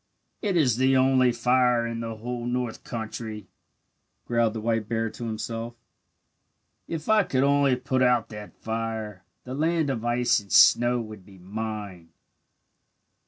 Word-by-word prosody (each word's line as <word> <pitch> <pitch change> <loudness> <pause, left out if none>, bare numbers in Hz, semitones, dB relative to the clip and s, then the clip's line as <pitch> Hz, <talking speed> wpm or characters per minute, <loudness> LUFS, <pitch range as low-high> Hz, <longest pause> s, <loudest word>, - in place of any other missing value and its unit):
"It 200 -4 0
is 125 -8 +3
the 130 +1 +3
only 130 -1 +4
fire 125 0 +2
in 115 0 -4
the 115 -1 -5
whole 120 +2 -5
north 120 -2 -3
country," 110 -2 -6 0.8
growled 115 -2 +1
the - - -3
white 110 -1 -1
bear 115 -1 -1
to 120 - -7
himself. 115 +1 -5 1.1
"If 160 -2 -5
I 220 -1 +5
could 135 -8 0
only 140 -2 +3
put 130 +1 -1
out 125 -3 +3
that 105 -1 -10
fire 110 -3 -4 0.2
the 130 - -7
land 160 0 +1
of 115 -4 -4
ice 120 0 +2
and 100 -2 -15
snow 120 +1 +6
would 110 -4 -8
be 95 +1 -16
mine. 100 -2 -6
115 Hz, 150 wpm, -26 LUFS, 110-130 Hz, 1.1 s, snow